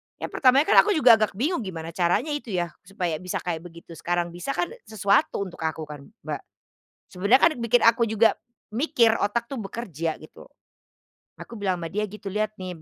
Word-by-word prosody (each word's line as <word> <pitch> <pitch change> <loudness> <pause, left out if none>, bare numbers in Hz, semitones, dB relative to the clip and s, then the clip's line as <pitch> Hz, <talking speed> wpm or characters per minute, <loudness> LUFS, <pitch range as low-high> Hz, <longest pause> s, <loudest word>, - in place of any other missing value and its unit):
Ya - - -6
pertamanya 265 +1 +4
kan 400 - +6
aku 415 -3 +4
juga 245 -7 +6
agak 215 -2 0
bingung 290 - 0
gimana 170 -6 -6
caranya 175 - 0
itu 290 -4 -4
ya, 175 -1 -1 0.2
supaya 175 -5 -3
bisa 180 0 -5
kayak 170 -2 -2
begitu, 170 0 -15
sekarang 175 0 -1
bisa 175 +11 -4
kan 350 - -1 0.2
sesuatu 200 -1 +1
untuk 185 -4 -10
aku 160 0 -3
kan 145 -2 -10 0.2
Mbak. - - -4 0.8
Sebenarnya 200 +8 +4
kan 335 - +4
bikin 235 +1 +4
aku 230 +1 +5
juga, 220 +1 +4 0.4
mikir, 245 -4 +3
otak 235 +3 0
tuh 255 -4 -5
bekerja 170 -7 -4
gitu. 155 - -15 0.9
Aku 235 - -9
bilang 190 -4 -1
sama 165 - -4
dia 205 +6 -2
gitu, 210 -1 -9
"Lihat 215 +1 -2
nih 185 -1 -6
200 Hz, 185 wpm, -25 LUFS, 175-235 Hz, 0.9 s, kan